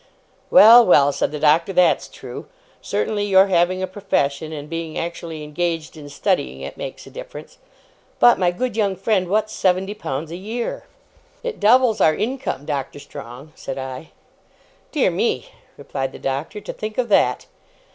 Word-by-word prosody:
'Well, 240 -2 +9
well,' 145 -8 +5
said - - -1
the 150 - -4
Doctor, 155 +5 +3
'that's 180 -1 +3
true. - - -10 0.3
Certainly, 205 -1 -1
your 195 -1 +5
having 185 +1 +2
a - - +2
profession, 160 -6 -2
and 150 -2 -7
being 165 0 -5
actually 165 -2 -5
engaged 165 +1 -3
in 145 -2 -10
studying 65 - -1
it, 70 - -7
makes - - -7
a - - -13
difference. - - -10 0.6
But, 240 - +6
my 180 -2 +3
good 240 +7 -3
young 205 -4 +1
friend, 190 -1 0
what's 215 +3 0
seventy 190 +2 0
pounds 155 -6 -5
a 170 - -5
year?' 225 +5 -5 0.6
'It 485 -2 -4
doubles 225 -1 +4
our 155 -1 +4
income, 250 - -3
Doctor 140 -2 -4
Strong,' 140 0 -10
said 135 - -7
I. 130 +3 -7 0.8
'Dear - - +2
me!' - - -1 0.3
replied 135 0 -4
the - - -8
Doctor. 140 +10 -4
'To - - -7
think 215 0 -6
of 250 -2 0
that! 205 - +2
175 Hz, 165 wpm, -21 LUFS, 145-205 Hz, 0.8 s, Well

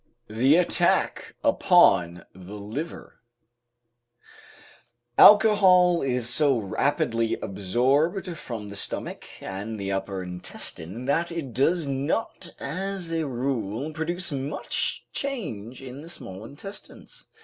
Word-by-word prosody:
THE 125 +7 +4
ATTACK 175 0 +1
UPON 85 0 +4
THE 95 +3 -10
LIVER 115 +11 -7 2.0
Alcohol 190 -5 +7
is 125 -3 -1
so 135 +2 +3
rapidly 115 +2 0
absorbed 135 - 0
from 115 -8 -7
the 100 - -8
stomach - - -5 0.2
and 105 +3 -5
the 100 0 -3
upper 95 -1 -3
intestine, 90 +3 -7
that 165 +5 +1
it 155 -7 -5
does 160 +7 +2
not 140 +7 -2
as 185 +4 -4
a 165 -2 -1
rule 125 +1 -2
produce 170 +3 -1
much 140 +1 -3
change 130 - -5
in 130 +2 -8
the 165 - -11
small 95 - -9
intestines. 195 - -11
135 Hz, 105 wpm, -26 LUFS, 105-170 Hz, 2.0 s, Alcohol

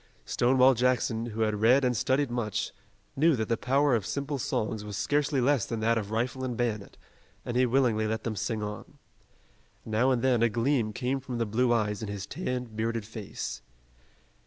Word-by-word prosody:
Stonewall 130 +2 +4
Jackson, 120 -2 +1
who 115 -1 -4
had 110 -1 0
read 130 +4 +5
and 125 -1 +1
studied 130 +3 +1
much, 105 -4 -2 0.4
knew 155 +2 +4
that 110 -3 -2
the 115 - +3
power 135 +4 +2
of 115 -4 +2
simple 140 +5 -3
songs 110 -2 -2
was 105 -1 -6
scarcely 145 +6 +1
less 130 -2 +3
than 115 - -3
that 115 +1 +3
of 105 -3 -2
rifle 120 +4 -2
and 125 -3 -3
bayonet, 110 -5 -2 0.5
and 120 - -4
he 125 0 +4
willingly 120 -4 +2
let 110 +1 -2
them 115 -2 -3
sing 110 +1 -2
on. 105 0 -7 0.9
Now 110 +4 +2
and 125 -2 +1
then, 125 -3 +3
a 115 - +4
gleam 115 0 +1
came 130 +5 -1
from 130 -2 -5
the 115 - 0
blue 120 +4 +1
eyes 105 -3 0
in 110 - -4
his 100 -1 -5
tanned, 125 -8 -4
bearded 115 0 -2
face. 110 -2 -6
120 Hz, 190 wpm, -28 LUFS, 110-130 Hz, 0.9 s, read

